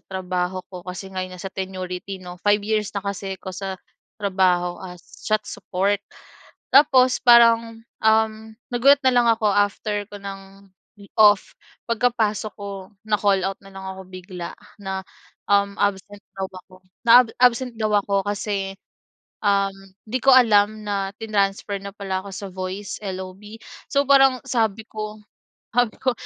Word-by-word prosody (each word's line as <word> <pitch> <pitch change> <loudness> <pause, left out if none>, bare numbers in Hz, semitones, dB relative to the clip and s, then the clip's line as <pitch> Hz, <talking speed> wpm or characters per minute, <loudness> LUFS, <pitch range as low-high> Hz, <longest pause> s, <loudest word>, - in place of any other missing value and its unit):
trabaho 185 -1 -3
ko 180 - -7
kasi 190 +1 -7
nga 185 - -3
yon 185 0 -6
nasa 190 +1 -7
tenurity 185 0 -5
'no. 180 -1 -11
5 205 0 +2
years 215 -1 0
na 200 - -3
kasi 195 -1 -4
ako 190 0 -8
sa 190 +1 -5 0.4
trabaho 185 -3 +1
as 180 -2 -10 0.2
chat 215 0 +1
support. 195 +2 -1 0.7
Tapos 265 -3 +6
parang, 230 -1 +6 0.2
um, 220 0 +4 0.4
nagulat 275 +4 +5
na 260 - +5
lang 245 -1 +4
ako 225 -2 +3
after 205 +1 0
ko 205 - -8
ng 195 0 -10 0.5
off, 205 -2 +5 0.4
pagkapasok 220 -3 0
ko, 200 -2 -7 0.2
na-call 200 -2 +2
out 195 - -4
na - - -13
lang 195 0 -9
ako 190 0 -7
bigla 185 -1 -8 0.3
na, 190 -1 -4 0.5
um, 200 0 +2
absent 205 0 -1 0.2
daw 190 0 -2
ako, 185 0 -14 0.3
na 230 - +7
ab - - -12
absent 250 0 +3
daw 215 -1 0
ako 200 -1 +1
kasi, 200 -1 -2 0.7
um, 200 -1 +2 0.4
'di 250 - -1
ko 270 - +7
alam 215 -3 +4
na 195 -1 -2
tinransfer 200 -2 -1
na 200 - -6
pala 190 -2 -3
ako 200 - -8
sa 200 - -6
voice 190 +2 -5
LOB. 190 +3 -7 0.3
So 280 0 +3
parang 270 -2 +5
sabi 220 -4 0
ko, 215 0 -6 0.5
sabi 245 -1 +1
ko, 260 -1 +2
200 Hz, 150 wpm, -22 LUFS, 190-220 Hz, 0.7 s, na